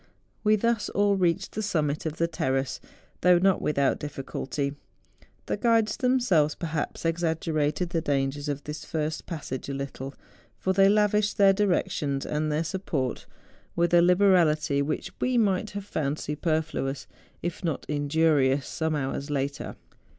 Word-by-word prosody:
We 215 Hz, 0 st, +5 dB
thus 230 Hz, +1 st, 0 dB
all 205 Hz, 0 st, +2 dB
reached 185 Hz, 0 st, +1 dB
the 215 Hz, -, -3 dB
summit 155 Hz, -7 st, -1 dB
of 155 Hz, 0 st, -5 dB
the 170 Hz, -, +2 dB
terrace, 135 Hz, -4 st, -1 dB, 0.4 s
though 180 Hz, 0 st, +6 dB
not 190 Hz, +1 st, +3 dB
without 140 Hz, -2 st, +1 dB
difficulty. 140 Hz, 0 st, -4 dB, 0.7 s
The -, -, -2 dB
guides 225 Hz, 0 st, +2 dB
themselves, 240 Hz, -, +2 dB
perhaps, 160 Hz, -1 st, -4 dB
exaggerated 165 Hz, 0 st, 0 dB
the 165 Hz, -2 st, 0 dB
dangers 140 Hz, -1 st, -1 dB
of 145 Hz, 0 st, -3 dB
this 150 Hz, +1 st, -6 dB
first 155 Hz, 0 st, -3 dB
passage 140 Hz, -6 st, -5 dB
a 140 Hz, -, -3 dB
little; 135 Hz, 0 st, -6 dB, 0.4 s
for 190 Hz, -, 0 dB
they 195 Hz, +1 st, +5 dB
lavished 210 Hz, 0 st, +2 dB
their 195 Hz, -1 st, +6 dB
direc¬ 195 Hz, -2 st, +1 dB
tions 140 Hz, -2 st, -2 dB
and 150 Hz, 0 st, -1 dB
their 150 Hz, +2 st, +1 dB
support 160 Hz, -7 st, -3 dB, 0.5 s
with 170 Hz, 0 st, +1 dB
a 175 Hz, -, +7 dB
liberality 175 Hz, -6 st, +4 dB
which 145 Hz, +2 st, -2 dB
we 255 Hz, -1 st, +1 dB
might 205 Hz, -2 st, +2 dB
have 200 Hz, -, -5 dB
found 150 Hz, -6 st, -2 dB
superfluous, 150 Hz, -3 st, -2 dB, 0.4 s
if 175 Hz, +1 st, -4 dB
not 160 Hz, -5 st, -2 dB
injurious, 145 Hz, -2 st, +2 dB
some 160 Hz, -1 st, -1 dB
hours 140 Hz, 0 st, -3 dB
later. 140 Hz, -1 st, -3 dB
160 Hz, 150 wpm, -27 LUFS, 145-190 Hz, 0.7 s, a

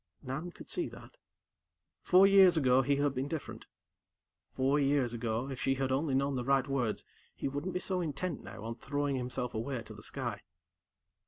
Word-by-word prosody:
Nan 140 Hz, +6 st, -4 dB
could -, -, -13 dB
see 355 Hz, -, -1 dB
that. -, -, -13 dB, 0.8 s
Four 185 Hz, +2 st, +6 dB
years 195 Hz, -3 st, +7 dB
ago, 130 Hz, -3 st, +4 dB
he 140 Hz, +2 st, +2 dB
had 145 Hz, 0 st, +1 dB
been 135 Hz, +1 st, -2 dB
different. 155 Hz, -2 st, -6 dB, 0.8 s
Four 135 Hz, +2 st, +1 dB
years 135 Hz, -4 st, +2 dB
ago, 115 Hz, +1 st, -2 dB
if 130 Hz, -, -5 dB
she 135 Hz, -, +2 dB
had 135 Hz, 0 st, -1 dB
only 135 Hz, +1 st, +1 dB
known 140 Hz, +1 st, +1 dB
the 125 Hz, -, -1 dB
right 135 Hz, +1 st, +2 dB
words, 125 Hz, -6 st, -1 dB, 0.3 s
he -, -, -3 dB
wouldn't 145 Hz, +7 st, -3 dB
be -, -, +1 dB
so 185 Hz, -1 st, -1 dB
intent 165 Hz, +1 st, -3 dB
now 110 Hz, -, -9 dB
on 115 Hz, +1 st, -4 dB
throwing 145 Hz, +2 st, -1 dB
himself 125 Hz, -1 st, -3 dB
away 115 Hz, +2 st, -3 dB
to -, -, -10 dB
the -, -, -12 dB
sky. -, -, -4 dB
135 Hz, 185 wpm, -32 LUFS, 130-150 Hz, 0.8 s, years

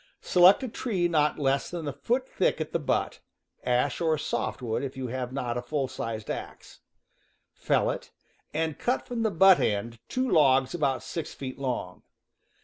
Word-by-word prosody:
Select 185 Hz, +8 st, +6 dB
a -, -, -2 dB
tree 210 Hz, -6 st, -1 dB
not 150 Hz, -3 st, +2 dB
less 135 Hz, -1 st, +1 dB
than 170 Hz, -3 st, -5 dB
a 140 Hz, -, -2 dB
foot 255 Hz, +2 st, -1 dB
thick 185 Hz, -, 0 dB
at 155 Hz, -, -4 dB
the 170 Hz, -, 0 dB
butt 145 Hz, -, -1 dB, 0.4 s
(ash 125 Hz, +4 st, +1 dB
or 160 Hz, -2 st, +2 dB
soft -, -, -2 dB
wood 115 Hz, +2 st, -1 dB
if 135 Hz, -1 st, -5 dB
you 130 Hz, -2 st, -4 dB
have 125 Hz, 0 st, -4 dB
not 120 Hz, -3 st, -2 dB
a -, -, -5 dB
full 135 Hz, +2 st, -2 dB
sized 110 Hz, -3 st, -5 dB
axe). -, -, -8 dB, 0.7 s
Fell -, -, +1 dB
it, -, -, -7 dB, 0.4 s
and 160 Hz, -1 st, -2 dB
cut 250 Hz, +2 st, 0 dB
from 240 Hz, -2 st, -3 dB
the 220 Hz, -, +2 dB
butt 190 Hz, 0 st, +6 dB
end 110 Hz, +3 st, -1 dB
two 255 Hz, +1 st, 0 dB
logs 135 Hz, -, +4 dB
about 140 Hz, -6 st, 0 dB
six 165 Hz, -, -5 dB
feet 130 Hz, -1 st, -7 dB
long. 125 Hz, -9 st, -3 dB
145 Hz, 180 wpm, -27 LUFS, 130-175 Hz, 0.7 s, Select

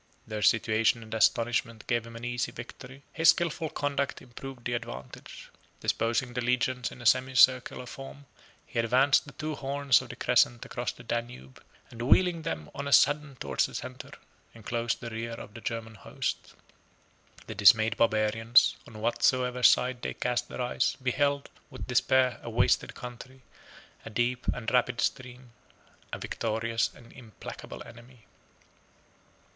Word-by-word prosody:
Their 110 Hz, -1 st, -5 dB
situation 110 Hz, +2 st, +3 dB
and 110 Hz, -, -10 dB
astonishment 115 Hz, 0 st, +1 dB
gave 120 Hz, -2 st, -1 dB
him 115 Hz, -, -11 dB
an 115 Hz, +1 st, -7 dB
easy 120 Hz, -1 st, -2 dB
victory; 130 Hz, +2 st, -11 dB
his 165 Hz, -1 st, +5 dB
skilful 165 Hz, -2 st, +2 dB
conduct 145 Hz, -3 st, -2 dB
improved 130 Hz, 0 st, -10 dB
the 120 Hz, -, -1 dB
advantage. 65 Hz, -, -7 dB, 0.3 s
Disposing 120 Hz, +2 st, 0 dB
the 125 Hz, -, -2 dB
legions 125 Hz, 0 st, 0 dB
in 120 Hz, -, -11 dB
a -, -, -12 dB
semicircular 130 Hz, 0 st, +4 dB
form, 135 Hz, +2 st, -10 dB, 0.4 s
he -, -, -4 dB
advanced 130 Hz, +5 st, +4 dB
the -, -, -9 dB
two 155 Hz, 0 st, -4 dB
horns 140 Hz, -2 st, +2 dB
of -, -, -11 dB
the -, -, -7 dB
crescent 120 Hz, -1 st, +2 dB
across 120 Hz, -, -3 dB
the 120 Hz, -, -14 dB
Danube, 115 Hz, -, -5 dB, 0.3 s
and 115 Hz, -, -9 dB
wheeling 170 Hz, +7 st, +3 dB
them 115 Hz, -, -5 dB
on 140 Hz, 0 st, -5 dB
a -, -, -3 dB
sudden 145 Hz, -1 st, +4 dB
towards -, -, 0 dB
the -, -, -11 dB
centre, -, -, -7 dB, 0.5 s
enclosed 115 Hz, +1 st, -2 dB
the 115 Hz, -2 st, -6 dB
rear 115 Hz, +1 st, -4 dB
of 115 Hz, -, -9 dB
the 120 Hz, -, -10 dB
German 115 Hz, -1 st, -4 dB
host. 105 Hz, -, -5 dB, 0.9 s
The -, -, -6 dB
dismayed 110 Hz, +2 st, +5 dB
barbarians, 115 Hz, +1 st, +3 dB
on 110 Hz, -1 st, -11 dB
whatsoever 125 Hz, +2 st, +1 dB
side 125 Hz, 0 st, +4 dB
they -, -, -4 dB
cast 125 Hz, 0 st, -1 dB
their 125 Hz, -, -4 dB
eyes, 125 Hz, -, 0 dB
beheld, 140 Hz, +2 st, 0 dB, 0.2 s
with 130 Hz, -3 st, -8 dB
despair, 130 Hz, 0 st, +2 dB
a -, -, -7 dB
wasted -, -, +1 dB
country, 125 Hz, +2 st, -10 dB, 0.6 s
a -, -, -8 dB
deep 120 Hz, +3 st, -1 dB
and 115 Hz, -3 st, -2 dB
rapid 125 Hz, -1 st, +2 dB
stream, 125 Hz, -2 st, -3 dB, 0.6 s
a -, -, -3 dB
victorious 115 Hz, +1 st, -1 dB
and 120 Hz, -4 st, -16 dB
implacable 115 Hz, -4 st, -10 dB
enemy. 120 Hz, 0 st, -15 dB
120 Hz, 150 wpm, -28 LUFS, 115-130 Hz, 0.9 s, his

